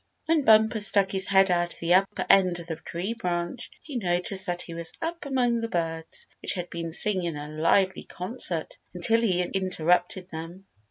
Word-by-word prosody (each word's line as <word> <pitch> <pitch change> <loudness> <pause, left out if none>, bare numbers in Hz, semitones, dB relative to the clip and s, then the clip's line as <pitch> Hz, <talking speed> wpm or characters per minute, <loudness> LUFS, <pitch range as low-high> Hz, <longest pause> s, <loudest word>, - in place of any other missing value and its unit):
When 320 -1 +2
Bumper 220 -1 +4
stuck 200 -1 +4
his 190 0 +3
head 195 -1 +4
out 175 0 0
of - - -12
the 170 +1 +1
upper 195 +2 +1
end 185 -3 +4
of 170 - -9
the 165 - -5
big - - -26
tree 180 +7 -4
branch, 180 +2 -4
he 285 -5 -6
noticed 190 0 +1
that 175 0 -2
he 170 - -10
was 165 0 -3
up 335 -2 -4
among 245 -4 0
the 230 - -4
birds 165 -2 -3 0.2
which - - +2
had 180 -2 -6
been 170 -1 -5
singing 175 -2 0
a 145 0 -7
lively 165 +5 +1
concert 180 -4 -3 0.2
until 225 +6 +4
he 185 -6 +1
interrupted 180 0 0
them. 165 +4 -9
185 Hz, 195 wpm, -26 LUFS, 170-215 Hz, 0.2 s, Bumper